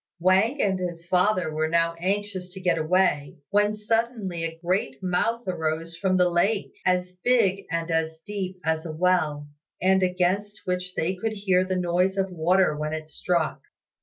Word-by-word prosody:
Wang 190 - +3
and 190 -5 +1
his 175 -2 -4
father 180 -2 +2
were 155 +1 0
now 165 +1 +2
anxious 190 0 -2
to 190 - -8
get 180 -1 +1
away, 155 -3 +1
when 205 +1 +3
suddenly 215 -5 -1
a 165 0 -4
great 170 -5 -1
mouth 220 +5 0
arose 165 -1 -2
from 185 +1 +1
the 180 -1 +4
lake, 195 +5 +1
as 180 0 +1
big 200 -6 +2
and 165 +1 -2
as 160 0 0
deep 190 -3 -4
as 160 0 0
a 165 - -5
well, 155 -3 +1 0.3
and 190 +1 +3
against 185 +3 0
which 180 0 -3
they 170 +4 0
could 220 +4 -2
hear 190 -3 +2
the 185 0 -2
noise 180 +2 +1
of 195 0 +1
the 180 - -10
water 175 0 +3
when 155 +1 -3
it 155 0 -5
struck. 170 0 -1
180 Hz, 175 wpm, -25 LUFS, 165-195 Hz, 0.3 s, the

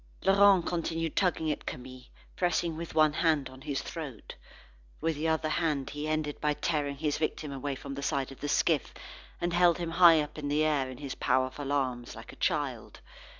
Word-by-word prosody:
Laurent 195 -2 +5
continued 165 -2 -2
tugging 175 -4 +1
at - - -5
Camille, 130 0 -7 0.3
pressing 175 -2 0
with 165 0 -7
one 155 -1 +5
hand 155 -4 +2
on 130 0 -13
his 135 -1 -3
throat. 150 -10 -7 0.7
With 160 0 0
the 155 +3 -2
other 160 0 +1
hand 150 -4 0
he 150 +1 -4
ended 155 -1 -2
by 150 -1 +1
tearing 145 -4 -1
his 150 0 -1
victim 155 -1 -2
away 140 0 -3
from 135 - -7
the 140 - -5
side 140 -1 -1
of 135 - -12
the 145 - -3
skiff, 155 -1 +1 0.4
and 175 0 -1
held 175 -1 +4
him 170 -2 -3
up 165 -3 +5
in 145 - -4
the 150 +2 +2
air, 145 -4 +1
in 130 - -8
his 140 -1 -5
powerful 130 +2 0
arms, 130 -4 -1
like 115 +1 -10
a - - -15
child. 145 - -2
150 Hz, 195 wpm, -30 LUFS, 135-165 Hz, 0.7 s, Laurent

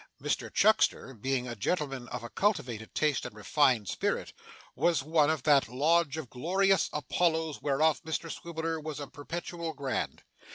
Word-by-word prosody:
Mr - - -2
Chuckster, 135 - +3
being 125 +2 -2
a 120 - -5
gentleman 135 - -2
of 125 -1 -6
a 120 - -6
cultivated 125 - -1
taste 150 -4 +1
and - - -7
refined 115 0 +2
spirit, - - -2 0.4
was 160 -2 +2
one 155 0 +3
of 155 -5 0
that 145 -3 +5
Lodge 155 +4 +2
of 155 -5 -5
Glorious 190 +10 +2
Apollos 160 0 0
whereof 150 +2 +2
Mr 160 0 -3
Swiveller 165 -1 -4
was 155 -1 -6
Perpetual 170 +2 -5
Grand. 140 -2 -3
150 Hz, 150 wpm, -30 LUFS, 130-165 Hz, 0.4 s, that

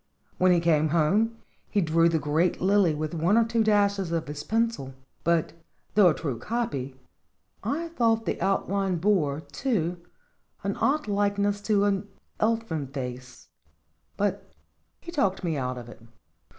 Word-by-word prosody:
When 185 0 +5
we 175 - +4
came 160 -2 +2
home, 200 +9 +2 0.3
he 210 - +1
drew 165 -1 +3
the 165 - +1
great 155 +4 +1
lily 190 -4 +3
with 155 +1 -3
one 170 +6 +2
or 230 - +5
two 230 0 +1
dashes 200 -4 +2
of 165 -2 -1
his 145 0 -6
pencil; 225 - -1 0.3
but 170 -1 +1 0.4
though 205 -3 +6
a - - +2
true 135 -8 -4
copy, 140 - -3 0.7
I 335 +4 -2
thought 225 -7 +1
the - - -2
outline 195 0 0
bore, 160 -6 +1
too, 175 - -2 0.6
an 200 0 -1
odd 300 0 +1
likeness 205 0 0
to 205 -2 +4
an 200 0 0 0.3
elfin 215 -10 0
face; 125 -2 -7 0.7
but 195 -1 -2 0.5
he 340 - -8
talked 200 - 0
me 165 -3 0
out 130 -2 -2
of 120 -1 -8
it. 115 -1 -13
185 Hz, 150 wpm, -26 LUFS, 155-210 Hz, 0.7 s, though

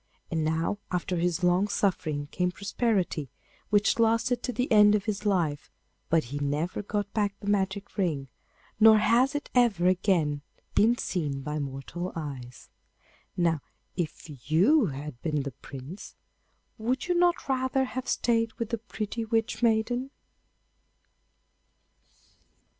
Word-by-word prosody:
And 160 -2 0
now 160 +6 0
after 180 0 -1
his 175 +1 0
long 180 +3 +3
suffering 160 -8 -1
came 180 0 0
prosperity, 195 - -1 0.4
which 210 +2 +3
lasted 230 +2 +2
to 250 - -2
the 250 +3 -2
end 210 -1 +7
of 205 -1 -1
his 210 -1 -2
life; 165 -7 0 0.4
but 165 -1 +3
he 140 +4 -5
never 145 +6 -1
got 205 0 -3
back 205 -2 -1
the - - -10
magic 200 0 -1
ring, 155 -8 0 0.5
nor 220 0 +8
has 235 +6 +3
it 290 - -4
ever 230 -8 +3
again 175 -6 +2 0.3
been 235 +3 +4
seen 145 - -2
by 150 +2 -3
mortal 140 +6 -5
eyes. 135 -6 -7 0.7
Now, 165 -4 +2 0.3
if 150 -6 -6
you 215 - +5
had 140 -3 -7
been 150 -4 -1
the 140 - -4
Prince, 140 - -10 0.6
would 250 +8 -1
you 355 - +2
not 350 -2 +2
rather 265 0 +1
have 255 0 -4
stayed 230 -1 +1
with 230 -2 -4
the 230 -2 -2
pretty 220 +1 -4
witch 225 +2 -1
maiden? 240 +3 +1
195 Hz, 135 wpm, -28 LUFS, 155-225 Hz, 0.7 s, nor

